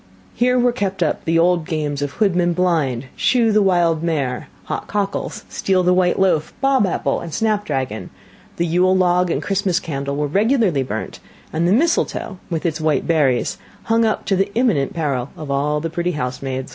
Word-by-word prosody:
Here 250 +1 +2
were 245 0 +3
kept 195 -6 -1
up 155 - -2
the 165 0 +2
old 175 0 +3
games 150 -3 -3
of 145 -1 -3
hoodman 180 -5 +1
blind, 155 -9 0
shoe 235 -3 +2
the 210 0 +4
wild 175 -4 +2
mare, 140 -7 -2 0.2
hot - - -5
cockles, 200 -1 -3
steal 185 -1 0
the 180 +1 +4
white 180 -1 +2
loaf, 185 -5 +1
bob 270 -6 +3
apple - - -1
and 170 - -7
snapdragon: 150 - -2 0.5
the 170 - 0
Yule 180 +3 +3
log 180 -1 +2
and - - -1
Christmas 195 -3 0
candle 140 -2 -4
were 150 +1 0
regularly 200 - +2
burnt, 110 -4 -5 0.3
and 165 +2 +1
the - - +2
mistletoe, 240 - 0
with 165 -2 -3
its 160 -1 -1
white 155 -3 +1
berries, 145 -7 +1 0.2
hung 225 0 +2
up 220 -1 0
to 195 - +1
the 195 +2 0
imminent 215 - +1
peril 140 -6 -1
of 150 -3 -6
all 145 +2 0
the 165 - -3
pretty 175 +1 -1
housemaids. 130 -1 -4
175 Hz, 185 wpm, -20 LUFS, 150-195 Hz, 0.5 s, the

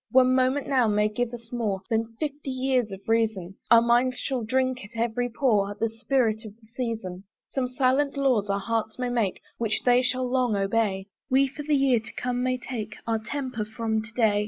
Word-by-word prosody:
One 255 0 +5
moment 260 +2 +2
now 255 -4 +3
may 210 0 +2
give 230 +2 -2
us 235 -1 -10
more 215 -6 -2
Than 225 0 0
fifty 290 -2 -4
years 255 -4 0
of 195 0 -9
reason; 220 -5 0
Our 230 0 +7
minds 245 +2 +3
shall 260 -3 -2
drink 255 +2 0
at 210 - -10
every 240 +1 0
pore 210 -5 +1
The 225 0 0
spirit 225 -1 0
of 210 -2 -10
the 225 0 -23
season. 220 -7 -4 0.3
Some 260 -2 0
silent 265 +3 +1
laws 255 -7 +2
our 200 - +1
hearts 220 +1 -2
may 250 -1 -1
make, 230 -6 0 0.2
Which 225 -2 0
they 245 0 +5
shall 255 0 0
long 250 -3 +1
obey; 195 -1 0 0.2
We 270 +1 +4
for 275 +3 -8
the 295 0 +1
year 270 -4 +4
to 220 - -11
come 250 0 -2
may 255 0 +1
take 220 -4 -6
Our 225 -1 0
temper 255 0 -4
from 220 0 -2
to 215 +1 -10
day. 220 -4 +3
235 Hz, 205 wpm, -26 LUFS, 220-255 Hz, 0.3 s, Our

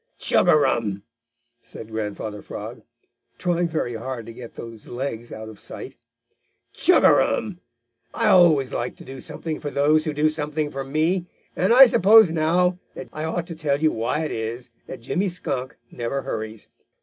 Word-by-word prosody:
"Chug - - +2
a - - +7
rum!" 110 -9 +1 0.6
said 110 - -11
Grandfather 105 -1 -4
Frog, - - -8 0.6
trying 175 -1 0
very 155 -7 -2
hard 115 0 -5
to 115 - -9
get 120 0 -11
those 115 -2 -9
legs 120 -2 -5
out 110 0 -7
of 110 -2 -11
sight. - - -8 0.8
"Chug - - +4
a - - +8
rum! 140 +11 +1 0.5
I - - -1
always 155 -8 +5
like 120 +1 -3
to - - -14
do 130 0 -9
something 160 -2 -5
for 145 - -4
those 150 +2 +2
who 155 - -2
do 150 +1 +2
something 150 -1 -3
for 135 0 -4
me, 160 +6 0 0.3
and 185 +4 +1
I 260 +3 +10
suppose 220 -4 +6
now 175 +3 +1 0.2
that - - -8
I 155 +1 -4
ought 165 +1 -2
to 170 - -8
tell 145 -3 -1
you 155 0 +3
why 115 +7 -1
it - - -4
is 115 +2 -5 0.2
that - - -8
Jimmy 185 +11 -1
Skunk 130 -7 -4
never 125 +3 -3
hurries. 110 0 -6
145 Hz, 175 wpm, -23 LUFS, 115-165 Hz, 0.8 s, I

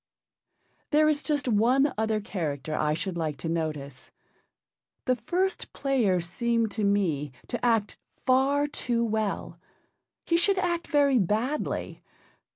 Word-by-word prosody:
There 305 0 +4
is 300 -1 +2
just 290 -3 -1
one 250 +5 +3
other 220 0 0
character 155 -8 -4
I 150 0 +1
should 185 +2 -4
like 155 -4 -2
to 165 - -5
notice. 150 -5 -4 1.0
The 255 - +3
First 360 - -2
Player 245 -10 +1
seemed 230 +6 0
to 215 - -2
me 175 -9 +1 0.2
to 240 - -4
act 225 -4 +1 0.3
far 270 +3 +3
too 240 -5 0
well. 215 -2 -2 0.7
He 335 - +2
should 390 +3 +2
act 345 -2 -1
very 280 -4 +3
badly. 220 - -1
230 Hz, 130 wpm, -27 LUFS, 180-280 Hz, 1.0 s, There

